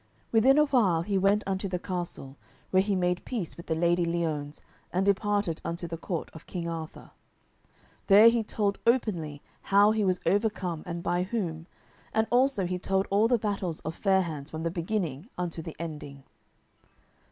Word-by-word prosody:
Within 255 +5 +5
a 300 - +6
while 205 - +2
he 200 +2 -2
went 200 +2 +3
unto 195 0 -2
the 180 -1 -2
castle, 175 -7 -5 0.4
where 185 - +5
he 200 0 0
made 180 -1 0
peace 220 -10 -4
with 170 - -11
the 160 - 0
Lady 175 +1 +2
Liones, 160 -4 -2 0.3
and 185 +2 +1
departed 200 -3 +1
unto 170 +1 -4
the 165 - -4
court 165 0 -4
of 160 - -12
King 175 -2 -4
Arthur. 165 -2 -7 1.0
There 210 +3 +8
he 230 0 +1
told 205 -1 -1
openly 170 - 0 0.2
how 205 +2 +5
he 220 -1 +1
was 185 -2 +1
overcome 190 -3 0
and 170 0 -4
by 175 +1 +1
whom, 180 -5 -3 0.5
and 220 0 +3
also 250 -5 +3
he 180 +1 -2
told 190 +1 0
all 205 +3 +4
the 245 0 +3
battles 200 -6 -2
of 160 - -4
Fair 190 +1 +2
hands 155 -4 -6
from 160 0 -5
the 165 - -1
beginning 170 - -3
unto 175 -2 -3
the 160 0 -8
ending. 150 -4 -7
180 Hz, 175 wpm, -28 LUFS, 165-205 Hz, 1.0 s, There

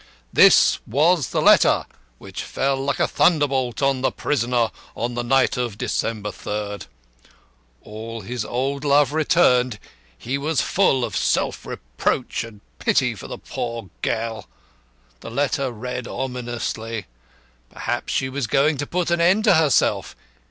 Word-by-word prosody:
This - - +6
was 150 +3 +2
the - - -1
letter - - +5 0.3
which 95 +6 -8
fell 135 0 -1
like 135 +1 -2
a - - +3
thunderbolt 140 -6 +1
on 135 -1 +2
the 135 - +1
prisoner 120 -4 0 0.2
on 120 +1 -3
the 120 - -2
night 135 +2 +2
of 120 -5 -3
December 105 -2 -2
3rd. 105 0 -5 1.0
All 110 +2 -7
his 120 +3 -4
old 135 +4 -2
love 145 -1 +3
returned 130 -7 +3 0.4
he 130 - -3
was 155 +2 0
full 135 -10 +2
of 110 - -6
self - - 0
reproach - - -2
and 110 -3 -12 0.2
pity - - +2
for - - -10
the - - -6
poor 115 -5 -6
girl. 115 -2 -2 0.7
The - - -9
letter 135 +1 -1
read 125 +1 -5
ominously. 120 -4 -4 0.6
Perhaps 120 +1 -3
she 130 - 0
was 130 -2 -3
going 145 +6 +2
to 145 +1 -3
put 175 -1 -1
an 170 0 +2
end 190 +5 +4
to 215 - +5
herself. 160 -4 +2
125 Hz, 145 wpm, -22 LUFS, 115-140 Hz, 1.0 s, This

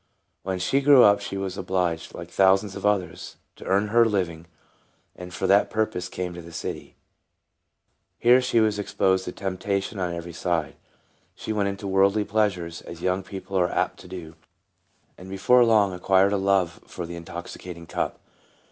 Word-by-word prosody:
When 95 0 -3
she 135 +10 +1
grew 140 -2 +7
up 100 0 +6
she 100 -1 -5
was 95 0 -4
obliged, 90 -3 -2
like - - -9
thousands 95 +1 +3
of - - -1
others, 100 -4 -2 0.2
to - - -12
earn 100 +2 +1
her 120 +2 +5
own 115 - +2
living, 85 -4 -2 0.7
and 90 0 -9
for 95 - -3
that 100 +2 +4
purpose 110 -5 -2
came 90 -1 -4
to 85 - -8
the 85 0 -12
city. - - -6 1.2
Here 125 +2 +5
she 125 -2 +2
was 110 -2 +2
ex 100 -1 -6
72 - - -33
TRANSFORMED. 95 -2 +4
posed 95 0 -1
to - - -4 0.4
temptation 100 +1 -1
on 90 -2 -2
every 85 0 -7
side. 85 -2 -2 0.6
She 110 - -4
went 100 -2 0
into 100 +1 -6
worldly 100 +2 +3
pleasures, 100 -6 -1
as 85 0 -10
young 95 +1 +1
people 95 0 -8
are 90 -1 +2
apt - - -1
to - - -13
do, 90 -3 -8 0.9
and 90 +1 -11
before 100 +6 +4
long 105 -5 +3
acquired 95 +2 +3
a - - +2
love 95 -3 +1
for 90 - -6
the 85 +1 -7
intoxicating 85 0 -8
cup. - - -3
95 Hz, 185 wpm, -25 LUFS, 90-100 Hz, 1.2 s, grew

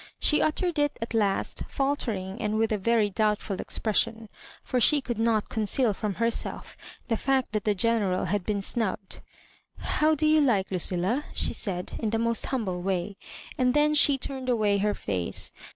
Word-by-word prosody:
She 300 - +3
uttered 325 +1 0
it 290 -1 +1
at 230 0 -5
last, 205 -3 0
fieiltering, 225 -9 -2
and 215 -1 -1
with 225 0 +1
a 215 - +1
very 220 0 +2
doubtful 210 -1 0
expression, 225 0 -1 0.3
for 255 - -1
she 295 +6 +5
could 240 -4 -4
not 225 -2 +1
con 220 -1 -2
ceal 225 -1 +3
from 205 -1 -3
herself 230 +3 -2 0.3
the 230 - +1
fact 265 +1 0
that 215 -1 -2
the 210 -1 +2
General 200 -3 +1
had 195 +2 -1
been 200 0 -1
snubbed. 200 -4 -2 0.6
"How 310 +1 +1
do 310 +1 0
you 310 0 +5
like 210 -10 +1
Lucilla?" 185 - +1
she - - 0
said, 180 -3 -3
in 220 - -1
the 225 - 0
most 230 0 0
humble 200 -9 -2
way; 190 +1 -2 0.4
and 250 +1 +2
then 300 +1 +3
she 285 -2 +5
turned 260 -1 -4
away 210 -4 +2
her 210 +1 0
face. 90 -4 -2
220 Hz, 180 wpm, -27 LUFS, 200-255 Hz, 0.6 s, she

